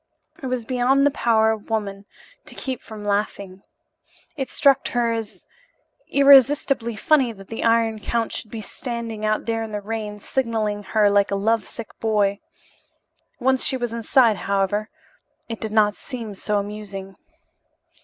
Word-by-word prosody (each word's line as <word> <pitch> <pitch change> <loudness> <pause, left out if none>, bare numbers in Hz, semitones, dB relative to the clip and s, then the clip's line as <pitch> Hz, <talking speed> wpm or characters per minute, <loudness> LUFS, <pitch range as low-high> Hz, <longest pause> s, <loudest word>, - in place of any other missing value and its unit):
It 265 - -4
was 250 -2 -2
beyond 260 +3 +2
the 285 - +4
power 220 -3 +3
of 220 0 -5
woman 200 -3 -3 0.4
to - - -9
keep 260 -2 -4
from 215 -2 -10
laughing. 200 -2 -2 0.7
It 270 -4 -3
struck 275 -1 +3
her 240 -1 0
as 225 -2 -6 0.6
irresistibly 275 -3 +5
funny 265 +2 +3
that 195 -2 -14
the 225 - -4
Iron 230 -1 +2
Count 230 +1 -1
should 215 - -5
be 225 0 -6
standing 230 -1 -5
out 215 0 0
there 225 -1 -1
in 220 -1 -5
the 210 - -1
rain, 210 0 -5
signaling 220 -4 -1
to 205 - -16
her 210 -2 +4
like 200 0 +3
a 200 - 0
love 215 +1 +1
sick 230 -2 -8
boy. 205 -3 +1 1.0
Once 260 0 +2
she 260 - 0
was 240 -2 -3
inside, 230 -1 +3
however, 200 +3 -1 0.6
it 230 -1 -6
did 220 - -3
not 210 -1 +4
seem 230 -1 -7
so 205 +2 -2
amusing. 200 -2 -6
220 Hz, 160 wpm, -23 LUFS, 205-240 Hz, 1.0 s, irresistibly